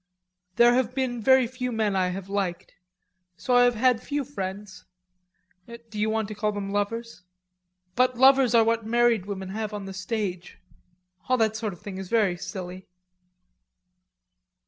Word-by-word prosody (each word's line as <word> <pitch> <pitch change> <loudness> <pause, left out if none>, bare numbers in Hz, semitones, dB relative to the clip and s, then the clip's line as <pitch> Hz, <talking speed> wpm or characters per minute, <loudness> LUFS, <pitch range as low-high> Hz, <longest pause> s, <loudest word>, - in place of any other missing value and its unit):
There 240 0 +6
have 250 0 0
been 250 -3 -2
very 260 +2 +5
few 250 +1 -4
men 215 -3 0
I 185 -1 +2
have 185 +1 -5
liked.... 195 -3 -3 0.6
So 250 - -2
I 245 0 +6
have 245 -1 +2
had 245 0 +2
few 290 0 -2
friends... 195 -6 -7 0.8
do 235 -2 -10
you 215 +1 +1
want 220 -1 -1
to - - -5
call 210 0 -1
them 200 -1 -5
lovers? 230 +1 -3 0.7
But 255 0 +2
lovers 265 -1 +5
are 230 - +6
what 230 0 0
married 230 -3 +2
women 190 -2 -5
have 215 +1 -4
on 205 -1 -6
the 195 - -7
stage.... 190 -2 -4 0.7
All 255 - +3
that 220 -2 +1
sort 215 -1 -3
of 175 - -15
thing 195 -2 -7
is 190 -2 -7
very 210 -6 +2
silly." 185 0 -7
220 Hz, 165 wpm, -26 LUFS, 195-240 Hz, 0.8 s, There